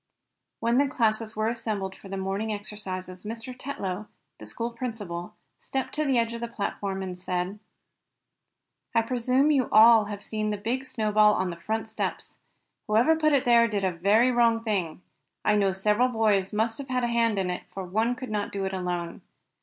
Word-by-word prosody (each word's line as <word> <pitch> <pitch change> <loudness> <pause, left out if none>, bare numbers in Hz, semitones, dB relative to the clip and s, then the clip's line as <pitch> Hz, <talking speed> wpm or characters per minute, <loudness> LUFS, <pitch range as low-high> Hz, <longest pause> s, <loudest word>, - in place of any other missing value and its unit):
When 235 +2 +3
the 285 - +3
classes 225 -3 0
were 215 0 0
assembled 215 -4 -2
for 195 - -13
the 195 - -4
morning 195 +3 -2
exercises 190 -3 -5
Mr. 230 +3 -6
Tetlow, 215 -7 -5 0.3
the - - -9
school 235 0 -3
principal, 210 -9 -5 0.2
stepped 265 -1 -3
to 305 0 0
the 270 -3 +2
edge 230 0 +1
of 235 - -6
the 235 - -2
platform, 200 -3 -3
and 185 -1 -5
said: 180 +2 -3 1.4
"I 230 - +4
presume 255 +4 +2
you 280 -3 +4
have 245 - -6
all 215 -2 +6
seen 215 +1 -3
the 210 - -1
big 245 +6 -2
snow 215 -4 -1
ball 210 0 +5
on 185 -1 -1
the - - -6
front 220 +6 -3
steps. 220 - -4 0.5
Whoever 230 +9 +4
put 310 -1 +2
it 275 - +3
there 235 -1 +6
did 205 -3 -2
a 190 - +2
very 205 +8 +3
wrong 230 -2 +3
thing. 185 -6 -2 0.4
I 210 - +4
know 200 -2 +3
several 210 +6 +2
boys 215 -5 +1
must 225 +3 0
have 275 - -7
had 250 -1 0
a - - +2
hand 230 -2 +1
in 185 -2 0
it, 180 - -5
for 190 -1 -5
one 220 +7 0
could 255 -2 -7
not 205 -1 -2
do 195 -1 -2
it 190 - -3
alone. 180 -2 -3
215 Hz, 195 wpm, -27 LUFS, 195-235 Hz, 1.4 s, all